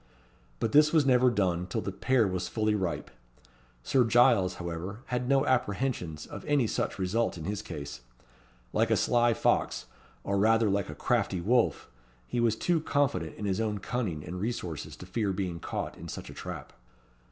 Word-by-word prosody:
But 110 Hz, -, 0 dB
this 150 Hz, +3 st, +6 dB
was 155 Hz, -4 st, +4 dB
never 125 Hz, -1 st, +5 dB
done 90 Hz, -5 st, 0 dB
till 90 Hz, -, -2 dB
the 100 Hz, -, -3 dB
pear 120 Hz, +4 st, +2 dB
was 95 Hz, -1 st, -2 dB
fully 110 Hz, -1 st, 0 dB
ripe. 95 Hz, -5 st, -2 dB, 0.7 s
Sir 130 Hz, -, +3 dB
Giles, 115 Hz, -6 st, +4 dB
however, 90 Hz, +5 st, -5 dB
had 125 Hz, 0 st, -2 dB
no 135 Hz, -1 st, +4 dB
apprehensions 105 Hz, -, -1 dB
of -, -, -9 dB
any 145 Hz, -4 st, +2 dB
such -, -, -2 dB
result 100 Hz, +3 st, 0 dB
in 80 Hz, -, -7 dB
his 100 Hz, +3 st, -3 dB
case. 70 Hz, -, -7 dB, 0.7 s
Like -, -, +2 dB
a -, -, +3 dB
sly 120 Hz, -1 st, +3 dB
fox, -, -, +1 dB, 0.4 s
or 100 Hz, 0 st, 0 dB
rather 110 Hz, 0 st, +4 dB
like 100 Hz, -3 st, 0 dB
a 75 Hz, -, -6 dB
crafty 100 Hz, -, 0 dB
wolf, 115 Hz, +7 st, +2 dB, 0.4 s
he 90 Hz, -, -2 dB
was 115 Hz, -2 st, +3 dB
too 170 Hz, +8 st, +1 dB
confident 145 Hz, -2 st, 0 dB
in 105 Hz, -, -5 dB
his 95 Hz, +1 st, 0 dB
own 105 Hz, -2 st, -1 dB
cunning 95 Hz, -8 st, -3 dB
and 90 Hz, +2 st, -5 dB
resources 100 Hz, -8 st, -4 dB
to -, -, -10 dB
fear 100 Hz, +2 st, -1 dB
being 90 Hz, -3 st, -3 dB
caught -, -, -4 dB
in -, -, -8 dB
such -, -, -7 dB
a -, -, -10 dB
trap. -, -, -7 dB
105 Hz, 180 wpm, -29 LUFS, 90-120 Hz, 0.7 s, this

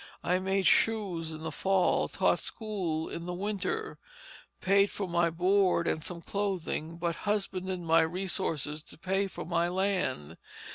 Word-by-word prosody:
I 180 Hz, +1 st, +2 dB
made 190 Hz, +1 st, 0 dB
shoes 190 Hz, -8 st, +2 dB
in 155 Hz, 0 st, -7 dB
the 160 Hz, -, -3 dB
Fall, 190 Hz, +3 st, +2 dB
taught -, -, +2 dB
school 185 Hz, -8 st, -2 dB
in 170 Hz, +1 st, -6 dB
the 180 Hz, -, -3 dB
Winter, 215 Hz, -, -3 dB, 0.6 s
paid 200 Hz, +1 st, +4 dB
for 200 Hz, -, -4 dB
my 170 Hz, -1 st, +2 dB
board 180 Hz, +1 st, +3 dB
and 155 Hz, -, 0 dB
some 170 Hz, 0 st, -5 dB
clothing, 180 Hz, -5 st, -2 dB
but 170 Hz, -1 st, -2 dB
husbanded 190 Hz, -3 st, -1 dB
my 165 Hz, 0 st, +4 dB
resources 160 Hz, -3 st, -1 dB
to -, -, -11 dB
pay 190 Hz, +3 st, 0 dB
for -, -, -7 dB
my 170 Hz, 0 st, +1 dB
land. 180 Hz, -, -1 dB
180 Hz, 150 wpm, -30 LUFS, 165-195 Hz, 0.6 s, paid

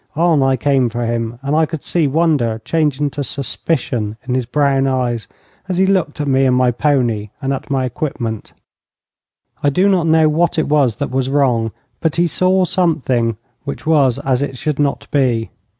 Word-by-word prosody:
On 165 Hz, -2 st, +3 dB
I 135 Hz, 0 st, +3 dB
came 135 Hz, -2 st, +2 dB
for 120 Hz, +1 st, -3 dB
him, 115 Hz, 0 st, -2 dB
and 140 Hz, +2 st, 0 dB
I 160 Hz, 0 st, +3 dB
could 160 Hz, -2 st, -6 dB
see 165 Hz, -4 st, +1 dB
wonder 140 Hz, -7 st, +1 dB
changing 150 Hz, -1 st, 0 dB
to 145 Hz, -, -4 dB
suspicion 125 Hz, -6 st, -2 dB
in 125 Hz, -, -1 dB
his 125 Hz, -2 st, -1 dB
brown 135 Hz, 0 st, +2 dB
eyes 125 Hz, -4 st, -1 dB, 0.4 s
as 180 Hz, -, -1 dB
he 190 Hz, -, +4 dB
looked 185 Hz, -6 st, 0 dB
at 145 Hz, -, -1 dB
me 135 Hz, 0 st, +3 dB
and 130 Hz, -1 st, +3 dB
at -, -, +2 dB
my 125 Hz, -1 st, +3 dB
pony, 120 Hz, -6 st, 0 dB
and 135 Hz, -1 st, -1 dB
at 135 Hz, -, -6 dB
my 135 Hz, -2 st, 0 dB
equipment. 120 Hz, -4 st, -4 dB, 1.1 s
I 145 Hz, -, +3 dB
do 180 Hz, +7 st, +2 dB
not 185 Hz, -4 st, +2 dB
know 160 Hz, -1 st, +4 dB
what 165 Hz, +3 st, +1 dB
it 160 Hz, -, +1 dB
was 140 Hz, -6 st, +2 dB
that 140 Hz, -3 st, -4 dB
was 130 Hz, 0 st, -1 dB
wrong, 125 Hz, -6 st, +1 dB, 0.3 s
but 160 Hz, -3 st, 0 dB
he 175 Hz, -, +3 dB
saw 185 Hz, +2 st, +2 dB
something 130 Hz, -, 0 dB, 0.3 s
which 140 Hz, -, -6 dB
was 140 Hz, -6 st, +3 dB
as 135 Hz, -2 st, 0 dB
it 135 Hz, -2 st, -3 dB
should 150 Hz, +2 st, -2 dB
not 145 Hz, -1 st, 0 dB
be. 125 Hz, -5 st, +1 dB
140 Hz, 195 wpm, -17 LUFS, 125-155 Hz, 1.1 s, he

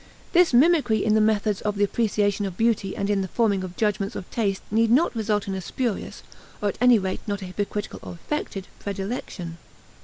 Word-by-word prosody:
This 355 Hz, -1 st, +5 dB
mimicry 275 Hz, -3 st, +4 dB
in 215 Hz, -, +3 dB
the 215 Hz, -, +4 dB
methods 215 Hz, -1 st, +1 dB
of 210 Hz, -1 st, -1 dB
the 205 Hz, -, +3 dB
apperception 205 Hz, -1 st, +1 dB
of 185 Hz, -2 st, -8 dB
beauty 225 Hz, -4 st, +1 dB
and 200 Hz, -, -1 dB
in 200 Hz, -1 st, +1 dB
the 190 Hz, -, -2 dB
forming 200 Hz, -2 st, +1 dB
of 180 Hz, -1 st, -7 dB
judgments 210 Hz, 0 st, 0 dB
of 185 Hz, -, -6 dB
taste 200 Hz, -4 st, -1 dB
need 225 Hz, +1 st, +3 dB
not 260 Hz, +4 st, +3 dB
result 210 Hz, -2 st, 0 dB
in 195 Hz, -, -2 dB
a 190 Hz, -, -3 dB
spurious, 235 Hz, +3 st, -3 dB, 0.4 s
or 205 Hz, -, 0 dB
at -, -, -5 dB
any 250 Hz, -1 st, +7 dB
rate 190 Hz, -2 st, -2 dB
not 200 Hz, -1 st, -2 dB
a -, -, -5 dB
hypocritical 205 Hz, +2 st, -4 dB
or -, -, -8 dB
affected, 195 Hz, -, -4 dB
predilection. 195 Hz, -4 st, -5 dB
205 Hz, 205 wpm, -24 LUFS, 195-225 Hz, 0.4 s, any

